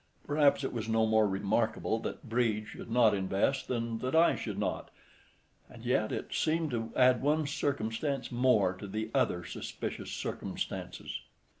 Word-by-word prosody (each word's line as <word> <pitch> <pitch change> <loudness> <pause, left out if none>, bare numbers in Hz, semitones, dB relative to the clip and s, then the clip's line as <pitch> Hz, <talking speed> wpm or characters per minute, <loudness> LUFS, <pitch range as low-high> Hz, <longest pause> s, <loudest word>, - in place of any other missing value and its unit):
Perhaps 145 -1 +3
it 135 - -2
was 115 -2 -3
no 110 0 +3
more 110 -1 +4
remarkable 105 +3 0
that 120 - -6
Brede 110 -2 +1
should - - -9
not 115 -2 +5
invest 100 +7 0
than 115 -2 -2
that 130 +5 -2
I 165 +1 +5
should - - -5
not—and 120 -1 -8
yet, 110 -3 +1
it - - -4
seemed 160 -1 +1
to 115 -1 -2
add 125 -2 +5
one 150 +3 +2
circumstance 135 -1 -2
more 120 -7 +3
to 95 +2 -8
the 110 +3 -4
other 90 -10 +1
suspicious - - -5
circumstances. - - -4
115 Hz, 150 wpm, -31 LUFS, 110-135 Hz, -, not